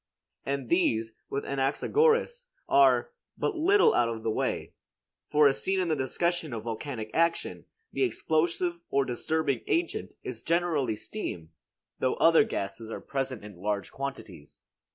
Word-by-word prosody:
And 140 -2 -2
these, 115 -10 +1 0.2
with 140 - -3
Anaxagoras, 450 - +1 0.2
are 345 +7 +4 0.3
but 415 - -1
little 380 +6 +4
out 120 -1 +3
of 115 -1 -5
the 110 - 0
way; - - -2 0.6
for 150 0 +6
as 135 - +1
seen 190 0 +1
in 180 -2 0
the 155 - +2
discussion 155 +3 -1
of 110 -2 -4
volcanic 115 0 -5
action, 170 +1 0 0.3
the - - -3
explosive 170 - 0
or 140 0 +2
disturbing 140 +1 -1
agent 170 0 -1
is 115 -3 -6
generally 160 -9 +1
steam, 90 - -6 0.5
though 130 - +1
other 165 +4 +6
gases 110 - -4
are - - -5
present 130 -6 -3
in 105 -4 -11
large 100 -2 -2
quantities. 110 - -7
140 Hz, 145 wpm, -28 LUFS, 115-175 Hz, 0.6 s, for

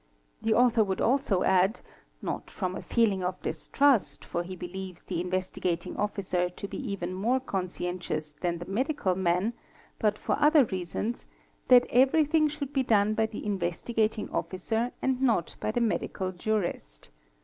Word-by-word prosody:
The 220 0 +2
author 240 -2 +5
would 190 -2 -2
also 245 -7 +2
add, 190 +3 +3 0.4
not - - -4
from 185 -2 -3
a - - -5
feeling 210 -6 +1
of 180 +1 -2
distrust, 275 -6 +1
for 170 - -2
he 185 +2 -6
believes 185 0 -7
the 175 -2 -3
Investigat 180 -1 -2
ing - - -6
Officer 190 -3 -1
to 180 +3 -7
be - - -6
even 180 -2 -3
more 230 +8 +1
conscientious 180 - -3
than 175 -1 0
the 175 - -7
medical 230 - 0
man, 185 +4 +1 0.5
but 210 -1 +2
for - - -1
other 300 -1 +6
reasons, 190 +4 -4 0.4
that 250 -1 +7
everything 305 +5 +4
should 290 -2 -5
be 270 - +2
done 215 -4 +3
by 220 0 +1
the 215 - -7
Investigating 210 +4 -1
"Officer 225 +6 -1
and 260 -1 +1
not 230 -10 +1
by - - -2
the 240 +3 0
medical 195 -4 -1
jurist. 175 - -3
200 Hz, 160 wpm, -28 LUFS, 180-240 Hz, 0.5 s, that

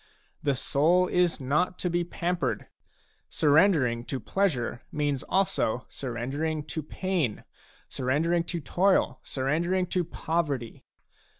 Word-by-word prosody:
The 140 -2 +1
soul 160 +7 +3
is 180 -2 +2
not 150 +7 0
to - - -2
be 175 0 +1
pampered; 170 - -2 0.6
surrendering 145 -6 +3
to 135 - -3
pleasure 130 -12 -1
means 145 -3 0
also 190 - 0
surrendering 140 +5 -3
to 160 - -2
pain, 165 - -2 0.4
surrendering 160 +7 0
to 170 0 -3
toil, 175 -4 +2
surrendering 170 +8 0
to 180 0 0
poverty. 155 -8 -3
155 Hz, 110 wpm, -28 LUFS, 130-180 Hz, 0.6 s, soul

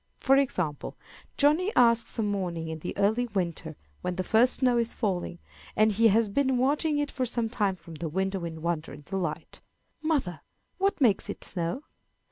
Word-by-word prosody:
For 270 - +4
example, 185 - -1 0.4
Johnny 310 +8 +3
asks 235 -1 +4
some 225 - -1
morning 180 -5 -2
in 160 0 -5
the 175 - -6
early 220 +5 +2
winter, 170 -6 -3 0.3
when 180 0 -3
the 185 - -2
first 230 +7 +4
snow 250 -2 +2
is 235 0 -1
falling, 180 - -2 0.4
and 215 0 +4
he 225 +3 +4
has 220 +1 +3
been 260 +5 +1
watching 295 +4 +1
it 290 0 -1
for 260 - -2
some 235 -1 -1
time 205 -5 0
from 170 -2 -13
the 160 +1 -5
window 190 +2 -2
in 160 -1 -6
wonder 165 -4 -2
and 145 0 -12
delight, 170 -5 -4 0.4
"Mother, 280 - -1 0.4
what 395 0 +1
makes 230 -8 +2
it - - -6
snow?" 175 - -3
205 Hz, 180 wpm, -28 LUFS, 170-250 Hz, 0.4 s, For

